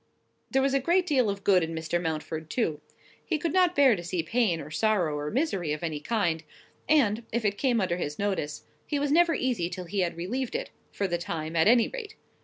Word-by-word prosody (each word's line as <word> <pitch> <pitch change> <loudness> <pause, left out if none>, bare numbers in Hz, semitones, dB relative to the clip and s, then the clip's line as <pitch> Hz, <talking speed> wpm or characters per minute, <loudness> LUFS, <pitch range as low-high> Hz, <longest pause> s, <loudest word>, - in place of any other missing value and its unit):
There 270 0 +2
was 275 0 +1
a 275 - +3
great 345 +7 +2
deal 260 - +2
of 200 0 -4
good 190 -3 +5
in 165 0 -3
Mr. 160 +2 -1
Mountford, 160 -1 -4
too. 160 -11 -1 0.4
He 325 - -1
could 315 +1 -2
not 360 -1 +3
bear 270 -5 +6
to 175 - -7
see 170 -1 -2
pain, 215 -4 +1
or 155 0 -8
sorrow, 180 -4 +1
or 145 0 -3
misery 195 - -1
of 150 - -5
any 155 -3 -2
kind; 170 -3 0 0.5
and, 235 -7 +3
if 235 0 -1
it 205 -1 +2
came 250 -4 +2
under 180 -3 0
his 150 -4 -4
notice, 190 -8 -2 0.2
he 295 - -1
was 285 0 0
never 335 +1 +4
easy 240 -10 -1
till 180 0 -6
he 195 +4 -3
had 175 -2 0
relieved 235 +9 -3
it, - - -3 0.2
for 200 - -1
the 175 -1 -1
time, 160 -1 -4
at 160 +2 +4
any 235 0 +5
rate. 435 -4 -7
200 Hz, 225 wpm, -27 LUFS, 165-265 Hz, 0.5 s, bear